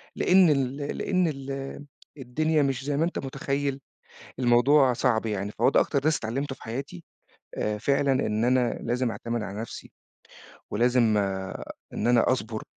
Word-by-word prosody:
لأن 185 -2 +5
ال 135 -2 +1
لأن 175 +5 0
ال 135 0 -5 0.3
الدنيا 150 +4 0
مش 135 -1 -2
زي 145 -1 -1
ما 165 - +2
أنت 175 - -3
متخيّل، 140 +1 -2 0.6
الموضوع 130 +2 +4
صعب 115 -2 +1
يعني. 105 -1 -2
فهو 120 - +4
ده - - +4
أكتر 140 - +1
درس 150 +1 +2
اتعلمته 130 +5 -3
في - - -20
حياتي، 115 -7 -6 0.5
آآ، 105 0 -1
فعلًا 140 +3 +2
إن 110 -3 0
أنا 125 -1 +2
لازم 125 0 0
أعتمد 115 +2 -4
على 105 +1 -5
نفْسِي، 115 - -8 0.8
ولازم 120 -1 +3 0.8
إن 110 - -2
أنا 120 +1 +4
أصبر، 110 -3 -3
130 Hz, 150 wpm, -26 LUFS, 115-140 Hz, 0.8 s, لأن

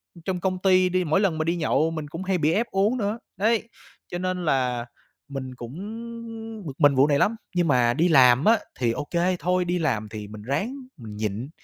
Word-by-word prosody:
ừm, 170 - -14
trong 185 -2 -1
công 185 0 -1
ty 185 -1 +4
đi, 185 0 +1
mỗi 160 +4 +2
lần 185 -6 +1
mà 155 - 0
đi 170 +2 0
nhậu 160 -1 +1
mình 155 -2 -5
cũng 165 +5 -6
hay 190 -1 0
bị 155 0 +2
ép 235 +3 +1
uống 205 +6 +2
nữa. 210 +1 -2 0.2
Đấy, 225 +2 +1 0.4
cho 175 - -5
nên 185 -1 -2
là 125 -4 +1 0.4
mình 130 -2 -6
cũng 120 +1 -8 0.9
bực 140 - -5
mình 145 -3 +5
vụ 135 +3 +5
này 140 -1 +2
lắm, 225 +2 +2 0.2
nhưng 175 -2 +2
mà 120 -3 +3
đi 165 +6 +2
làm 130 -2 +6
á 225 0 +5 0.2
thì 120 -2 +2
ô 145 - -4
kê, 180 +1 +1
thôi, 180 0 +1
đi 175 0 0
làm 110 -9 -1
thì 105 -2 -7
mình 105 0 -10
ráng 190 - -2 0.2
mình 110 -4 -9
nhịn, 110 +5 -3
160 Hz, 225 wpm, -25 LUFS, 130-185 Hz, 0.9 s, làm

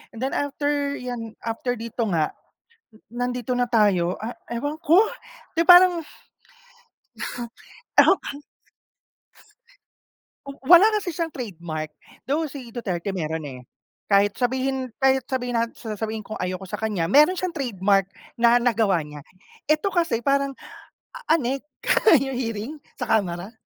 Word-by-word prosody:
and 225 - -8
then 270 - -1
after 285 0 -1
'yan, 235 -3 -6
after 230 +2 -2
dito 230 0 -3
nga, 160 -5 0 0.6
eh, 215 - -21
nandito 245 0 -3
na 245 - +2
tayo 200 -7 +2
ah, 230 +3 -5 0.2
ewan 290 +6 -3
ko, 335 +6 +5 0.6
'di 335 - +3
parang 355 -1 +8 1.8
uh - - +3
huh. 385 - +4
Tapang 285 - -7 2.1
oh, 275 - -11
wala 360 +6 +8
kasi 355 -4 -5
siyang 330 0 -2
trademark. 170 - -6 0.3
Though 300 +2 -1
si 255 -5 -10
Duterte 195 -4 -3
meron, 160 -3 -3
eh. 130 -2 -9 0.5
Kahit 200 0 +4
sabihin 260 +1 -1
kahit 265 0 +3
sabihin 245 -2 -2
nat 230 0 0
s - - -12
sasabihin 220 +1 -3
kong 215 - -6
ayaw 185 0 -3
ko 190 - -8
sa - - -4
kanya. 200 -7 0
Meron 300 - +6
siyang 365 -2 -2
trademark 200 -7 +1 0.3
na 235 +1 +5
nagawa 220 -7 +2
niya. 150 -1 -10 0.5
Ito 310 +6 +3
kasi 335 -10 +1
parang 275 +2 +1 0.6
a - - -9 0.2
anek 270 +1 -2 0.6
yung 270 +1 -3
hearing 230 0 -3 0.3
sa - - -2
kamara. 190 -1 -1
240 Hz, 140 wpm, -24 LUFS, 205-280 Hz, 2.1 s, parang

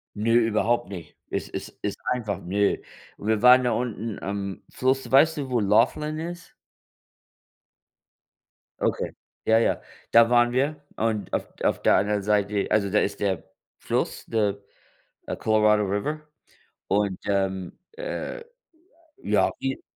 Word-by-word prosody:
Ne, 110 +2 +1
überhaupt 115 0 +2
nicht. 85 -5 -9
Es - - -3
ist - - -6
ist - - -2
einfach 110 -7 -2
ne. 100 +3 +1 0.4
Wir 110 0 0
waren 125 +1 +8
da 125 - +1
unten 115 -3 -3
am 100 -1 -4
Fluss. 130 +1 0
Weißt 155 +4 +5
du, 135 -3 -3
wo 120 - +2
Laughlin 125 +9 +2
ist? 175 +1 -7 2.3
Okay. - - 0 0.3
Ja, 110 0 +5
ja 115 - +1 0.3
da 115 0 +7
waren 120 0 +4
wir 145 +4 0
und 110 -2 -2
auf - - 0 0.2
auf - - +1
der - - +5
anderen 105 0 +1
Seite 105 0 +1
also 105 -2 +2
da 105 +2 +3
ist 100 0 -1
der 95 -4 -1 0.4
Fluss, - - -2
der, 105 -3 0 0.7
äh, - - -3
Colorado 105 -1 +3
River 120 +11 -2 0.7
und, 100 -1 0
ähm, 95 -2 -1 0.2
äh, - - -5 0.7
ja - - +2
die 135 0 -2
110 Hz, 135 wpm, -25 LUFS, 100-125 Hz, 2.3 s, waren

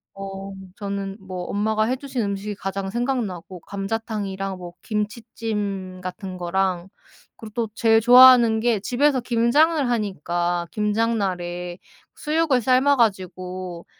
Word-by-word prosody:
어 195 0 -7 0.3
저는 200 -1 -4
뭐 185 -2 -6
엄마가 215 +1 0
해 255 +3 0
주신 265 -4 -3
음식이 200 +1 -3
가장 195 0 -4
생각나고 215 -7 -3
감자탕이랑 195 -2 -4
뭐 175 -1 -9
김치찜 210 -3 -4
같은 185 0 -6
거랑 180 0 -1 0.5
그리고 215 -2 -11
또 230 -3 -2
제일 225 -1 +4
좋아하는 245 -2 +8
게 230 -3 +1
집에서 260 +5 +2
김장을 265 +6 +3
하니까 175 -5 -1
김장 220 +2 0
날에 175 -2 -3 0.4
수육을 305 -5 +1
삶아 260 +4 +4
가지고 185 -5 -2
205 Hz, 275 characters per minute, -23 LUFS, 185-235 Hz, 0.5 s, 좋아하는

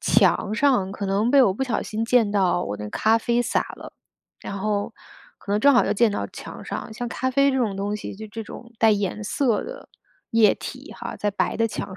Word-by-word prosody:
墙 205 - +3
上 245 -8 +2
可 200 -1 -4
能 205 +5 +1
被 280 -1 +6
我 190 -3 +2
不 265 - -3
小 250 -4 -1
心 220 +1 -3
溅 230 -3 +3
到 185 -3 +2
我 105 - -4
那 105 - -8
个 105 - -6
咖 220 +1 +3
啡 235 +1 +1
洒 - - +1 0.2
了。 - - -11 0.5
然 200 - -6
后， 205 0 -1 0.5
可 200 - -5
能 210 - +2
正 285 +2 +6
好 245 - +5
又 - - +1
溅 225 +1 +3
到 - - -2
墙 - - -9
上。 220 - -5
像 240 +1 -4
咖 260 +2 -2
啡 275 +1 +3
这 - - 0
种 215 -6 0
东 205 +1 -2
西， 200 - -7
就 220 - -8
这 225 +1 -6
种 235 +2 -11
带 225 -1 +6
颜 205 0 -1
色 230 0 0
的 - - -9 0.4
液 225 -2 +5
体 - - -8
哈， - - -7
在 205 - -1
白 - - -1
的 225 0 +1
墙 190 -2 -6
215 Hz, 250 characters per minute, -23 LUFS, 200-240 Hz, 0.5 s, 被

